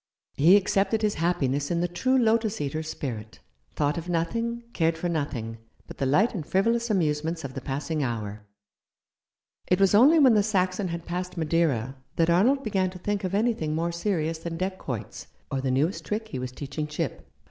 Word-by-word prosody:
He 170 +7 +6
accepted 200 +2 +1
his 210 -1 +2
happiness 145 -5 0
in 170 - 0
the 175 - +1
true 255 +10 +1
lotus 225 -2 +2
eater's 155 +2 -3
spirit 115 -8 -6 0.2
— 60 +1 -40
thought 150 +3 0
of 170 +2 -8
nothing, 230 +8 -1
cared 165 -1 +1
for 175 - -2
nothing, 135 -9 -3 0.3
but - - -11
the 135 - +1
light 190 - +3
and 180 -8 -3
frivolous 230 +8 +1
amusements 160 -3 0
of 135 -1 -6
the 135 - -5
passing 145 +4 -3
hour. 110 -5 -3 1.3
It 180 - +2
was 195 0 +4
only 270 +10 +7
when 270 -6 +6
the 210 - +5
Saxon 190 -2 0
had 170 -1 -5
passed 180 +1 -4
Madeira 150 -6 0 0.2
that 165 0 +3
Arnold 250 +11 +3
began 190 -4 0
to 185 - -9
think 205 +2 -2
of 185 +1 -1
anything 205 -9 0
more 170 +2 0
serious 170 -3 -1
than 165 0 -5
deck 185 +1 -3
quoits, 115 -6 -6 0.2
or 135 - -1
the 135 - -1
newest 145 +9 0
trick 220 +1 -3
he 130 - -4
was 125 0 -4
teaching 140 +3 -5
Chip. 150 - -4
170 Hz, 190 wpm, -26 LUFS, 145-200 Hz, 1.3 s, only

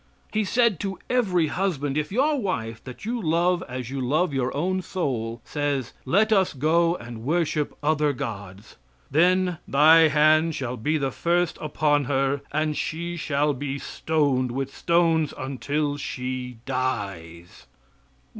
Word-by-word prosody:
He 215 0 +1
said 230 -3 +2
to 195 -1 -3
every 190 -10 +2
husband, 150 -5 -1
"If 150 +2 -1
your 280 +8 +2
wife, 115 - -3
that 130 +8 -9
you 235 +1 -2
love 175 +1 +1
as 125 0 -5
you 135 -1 -3
love 150 +6 +1
your 130 -1 0
own 185 +4 0
soul, 120 -11 -3
says, 145 -4 -2
'let 215 +4 +3
us 190 -3 +2
go 165 +5 +2
and 120 -6 -9
worship 155 0 0
other 150 -1 +2
gods,' 100 -5 -7 0.3
then 180 +2 +3
'Thy 160 +3 +6
hand 155 +1 +3
shall 125 -2 -3
be 150 +8 0
first 170 +5 0
upon 145 -1 +1
her 135 +1 0
and 155 +1 0
she 170 +3 -3
shall 150 -2 0
be 140 +1 -4
stoned 140 -4 0
with 135 +1 -4
stones 165 -3 +2
until 145 +2 -2
she 125 -2 -5
dies.'" 95 - -4
150 Hz, 140 wpm, -25 LUFS, 130-170 Hz, 0.3 s, Thy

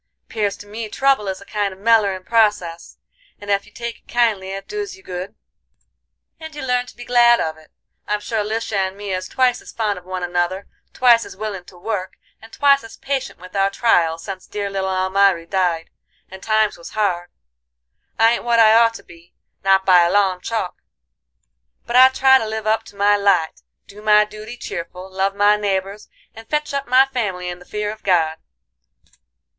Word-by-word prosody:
'Pears 210 -3 -1
to - - -12
me 215 +2 -6
trouble 270 -4 +1
is 190 0 -4
a - - -13
kind 205 -2 -2
of 190 - -13
mellerin' 205 -4 +2
process, 205 -7 0 0.4
and 205 0 -5
ef 200 +1 0
you - - -18
take 235 +1 -6
it - - -42
kindly 220 -6 +1
it 195 0 -6
doos 410 -2 -5
you 385 - -19
good, 185 +2 -6 1.0
and 315 -1 -9
you 295 - -6
learn 250 -1 0
to - - -14
be 240 - -10
glad 240 -1 +5
of 160 -1 -2
it. 155 -1 -19 0.4
I'm 210 0 0
sure 215 0 -2
Lisha 220 +1 -3
and 190 0 -1
me 205 -1 -5
is 185 0 -3
twice 255 -2 +1
as - - -12
fond 210 -4 -2
of 180 - -23
one 185 -1 -5
another, 175 +2 -1 0.3
twice 240 -2 +4
as - - -11
willin' 200 -4 -5
to 180 - -16
work, 190 0 -4 0.3
and 225 +1 -14
twice 280 -1 +3
as 225 - -12
patient 270 -1 -3
with 185 +2 -13
our 195 0 +2
trials 170 -7 +1
sense 190 -2 -7
dear 205 -1 -4
little 190 -1 -2
Almiry 190 -1 +2
died, 175 -3 -1 0.4
and 190 0 -10
times 215 -1 +1
was 170 - -10
hard. 175 -4 0 0.9
I 225 0 +5
ain't 235 - -1
what 235 -1 +2
I 220 -1 +7
ought 230 0 +4
to - - -10
be, 170 0 -18 0.3
not 195 0 +3
by 180 -2 +6
a 170 0 +2
long 190 -3 +2
chalk, 220 -5 -4 1.0
but 240 - -4
I 260 +1 +9
try 265 0 +5
to 225 - -3
live 220 0 -4
up 220 0 +2
to - - -15
my 205 +1 +3
light, 185 - +1 0.2
do 205 +1 -14
my 210 0 +5
duty 215 +3 -10
cheerful, 180 +1 -7
love 195 +1 -1
my 205 +1 +4
neighbors, 200 0 -3 0.2
and 225 0 -13
fetch 300 -1 -1
up 280 0 -2
my 255 +2 +5
family 205 -9 -3
in 175 0 -7
the 180 - -15
fear 210 +1 -3
of 215 - -11
God. 160 -4 +1
205 Hz, 200 wpm, -20 LUFS, 185-230 Hz, 1.0 s, I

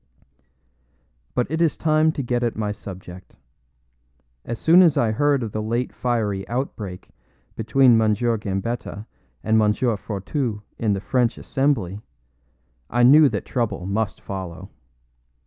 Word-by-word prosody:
But 125 - +2
it 160 +1 -1
is 165 -3 +2
time 155 0 +3
to 140 - -3
get 120 0 -1
at 120 -2 -1
my 105 -1 -2
subject. 95 -3 -10 1.1
As 120 - -5
soon 170 +8 +6
as 170 -5 +4
I 115 -2 +2
heard 140 +3 +1
of 110 - -4
the 110 - -3
late 115 +3 -2
fiery 105 -6 -1
outbreak 110 -7 -5 0.4
between 120 +1 +4
M. 110 -1 +3
Gambetta 105 -1 -3 0.4
and 110 0 +3
M. 105 -1 +4
Fourtou 110 0 -2 0.2
in 110 -3 +1
the 95 - -3
French 125 +1 0
Assembly, 110 -9 -1 0.9
I 120 +1 +2
knew 145 +4 +7
that - - -4
trouble 115 -7 -2
must 100 0 -2
follow. 95 0 -7
115 Hz, 135 wpm, -22 LUFS, 105-130 Hz, 1.1 s, knew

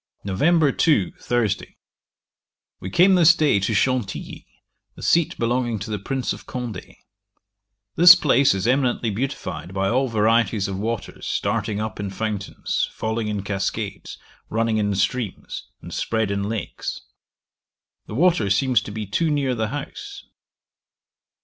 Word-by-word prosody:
'Nov. 145 - +2
2. 125 - +3
Thursday. 110 -5 -1 1.0
We 95 - -6
came 180 - +5
this 170 -2 +6
day 150 -11 +3
to 100 +3 -1
Chantilly, 125 -1 -1 0.5
a - - -10
seat 170 -2 +2
belonging 120 -1 0
to 100 +2 -6
the 105 - -2
Prince 130 +5 -2
of - - -12
Condé. 120 -7 -6 1.0
This 175 +2 +10
place 140 - +3
is 95 +1 -2
eminently 125 -2 +1
beautified 105 -5 -4
by 95 0 +1
all 130 +3 +1
varieties 110 -2 +2
of 95 -1 -4
waters 115 +1 -4
starting 105 -1 -1
up 110 0 -4
in 100 -1 -3
fountains, 105 0 -3
falling 110 0 -3
in 105 -2 -3
cascades, 100 -1 -4 0.3
running 115 0 0
in 105 -1 0
streams, 100 +1 -3 0.2
and - - -8
spread 110 -3 -1
in 100 0 -2
lakes. 110 -2 -5 1.1
The 105 - -7
water 155 - +3
seems 120 +4 +2
to 105 - -8
be 110 0 -4
too 160 - 0
near 140 -3 0
the 110 -2 -1
house. 400 - -7
115 Hz, 140 wpm, -22 LUFS, 100-135 Hz, 1.1 s, This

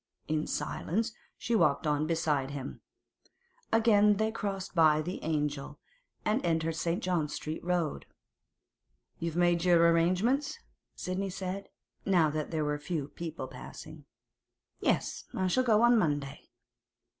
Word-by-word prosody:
In 155 0 -1
silence 220 +6 -2 0.2
she 235 - -2
walked 165 -7 +3
on 150 0 +1
beside 150 -5 0
him. 140 -1 -6 0.9
Again 210 -2 +5
they 220 +1 +1
crossed 200 -4 -4
by 155 -3 +5
the 175 +4 -4
'Angel' 150 -2 -2 0.5
and 215 +5 +1
entered 165 -1 0
St. 170 +6 -1
John 175 -5 0
Street 155 +1 -5
Road. 175 -4 -1 1.1
'You've 165 -1 -3
made 175 -1 +3
your 170 -2 +5
arrangements?' 190 - +1 0.4
Sidney 190 +2 -3
said, 190 +1 -5 0.3
now 175 -6 +3
that 155 0 -3
there 155 -2 -1
were 150 0 -1
few 150 -2 -3
people 160 -5 -6
passing. - - -10 0.7
'Yes; - - 0
I 185 - 0
shall 255 +8 +2
go 225 -2 +4
on 240 -1 +6
Monday. 145 -5 -2
170 Hz, 135 wpm, -30 LUFS, 155-195 Hz, 1.1 s, on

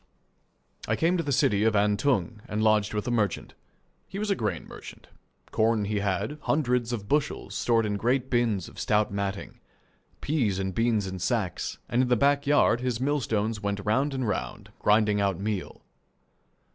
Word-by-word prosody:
I - - +1
came 170 +3 +2
to - - +1
the 145 - -2
city 105 -6 +2
of 110 -1 +2
Antung, 105 0 +1
and 105 -1 -2
lodged 105 -1 +2
with 105 - -2
a - - 0
merchant. 105 -6 -1 0.5
He 195 - -7
was 210 0 -1
a - - +3
grain 105 - -3
merchant. - - -12 0.4
Corn 110 -1 +2
he 105 0 -1
had, 100 +8 -2
hundreds 125 -5 0
of 105 -4 -4
bushels, 145 +2 -1
stored 115 -2 +1
in 105 -1 -1
great 125 +4 0
bins 115 -7 0
of - - -12
stout 105 -1 +1
matting; 100 0 -4 0.6
peas 125 -11 0
and 95 -1 -2
beans 115 -1 +1
in 95 -1 -5
sacks, 100 -2 -2
and 120 - +1
in 130 - +1
the 125 - +3
back 140 +3 +2
yard 145 -5 +4
his 125 -2 -1
millstones 115 -6 -1
went 100 0 -2
round 135 +7 +1
and 130 -3 -1
round, 65 -11 -4
grinding 105 -1 +3
out 100 -3 0
meal. 100 -2 -4
110 Hz, 175 wpm, -27 LUFS, 100-125 Hz, 0.6 s, yard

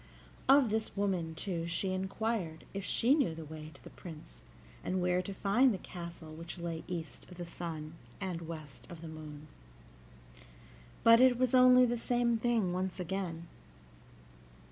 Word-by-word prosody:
Of 270 -5 +7
this 220 -1 -2
woman, 180 -5 0
too, 170 -1 -3
she 180 +3 -1
inquired 190 -3 -2
if 195 0 -4
she 240 +6 +3
knew 270 - +2
the 160 -1 -7
way 155 0 -8
to 140 - -16
the - - -11
Prince, 150 - -11 0.4
and 185 - -1
where 180 0 +2
to 185 - -6
find 210 +7 +3
the 200 - -1
castle 170 -3 -8
which 165 +3 -7
lay 170 -2 -4
east 170 -4 -6
of 180 - -12
the 175 - -5
sun 160 -2 -6 0.3
and 175 -4 -4
west 155 -4 -8
of 170 -3 -9
the 165 - -7
moon. 155 -1 -9 1.6
But 230 0 +8
it 255 -1 +6
was 255 0 +1
only 255 0 +8
the 240 -1 -1
same 240 -1 +2
thing 225 -6 +1
once 185 +1 -2
again. 175 -2 -3
180 Hz, 165 wpm, -33 LUFS, 165-225 Hz, 1.6 s, But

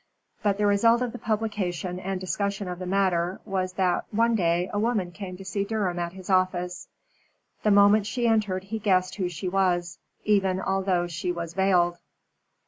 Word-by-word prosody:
But 205 -2 +1
the 210 - +1
result 230 +4 +4
of 245 - -2
the 245 - -8
publication 195 -5 -2
and 190 0 -3
discussion 200 +1 -2
of 180 0 -5
the 185 - -5
matter 185 -2 +1
was 185 -3 -2
that 185 -1 +1
one 230 +2 +2
day 175 -3 +1
a 205 - 0
woman 210 -5 0
came 185 -1 -7
to 195 - -10
see 200 +1 -1
Durham 200 -4 -1
at 170 0 -3
his 185 -1 -11
office. 185 -1 0 0.7
The 215 - +2
moment 205 +1 +5
she 240 +1 -1
entered 210 -5 +1
he 220 +3 -5
guessed 185 -3 +1
who 185 -3 -1
she 175 +2 -5
was, 180 -2 0 0.2
even 195 -3 +2
although 190 -2 0
she 175 +1 -3
was 170 -1 -5
veiled. 180 -2 +2
190 Hz, 180 wpm, -26 LUFS, 180-205 Hz, 0.7 s, moment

